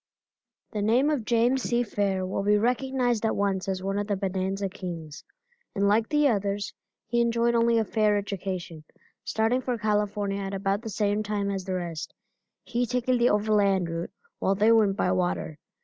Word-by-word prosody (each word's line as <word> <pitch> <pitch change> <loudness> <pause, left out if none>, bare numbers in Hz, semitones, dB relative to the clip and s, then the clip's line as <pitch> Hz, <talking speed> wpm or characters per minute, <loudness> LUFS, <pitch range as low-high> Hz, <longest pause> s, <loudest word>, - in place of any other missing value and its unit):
The 210 - -3
name 245 +8 +3
of 265 -8 -1
James 240 +3 +2
C. 240 0 +1
Fair 200 -4 -1
will 185 - -2
be 205 +1 +3
recognized 245 0 0
at 220 - +1
once 195 -2 0
as 190 -1 -2
one 195 +1 -1
of 205 - -3
the 205 - 0
bonanza 195 0 -2
kings, 175 -6 -7 0.5
and 200 0 +2
like 220 +2 +2
the 295 -1 +3
others 205 -3 -1 0.3
he 235 +1 +1
enjoyed 235 0 +2
only 235 0 +3
a 225 - +2
fair 210 -1 +2
education, 185 -5 -5 0.4
starting 225 +4 +1
for 250 -1 -2
California 210 -2 -1
at 195 0 -4
about 195 +1 -1
the 225 - -6
same 205 0 0
time 205 -1 -2
as 190 -2 -4
the 185 - -2
rest; 170 -3 -5 0.5
he 245 0 -1
taking 250 +1 +1
the 240 - +4
overland 205 -4 +2
route 165 +1 -4 0.3
while 195 - +1
they 210 +3 +4
went 210 -3 +4
by 180 - +1
water. 175 -4 -1
205 Hz, 180 wpm, -27 LUFS, 195-230 Hz, 0.5 s, the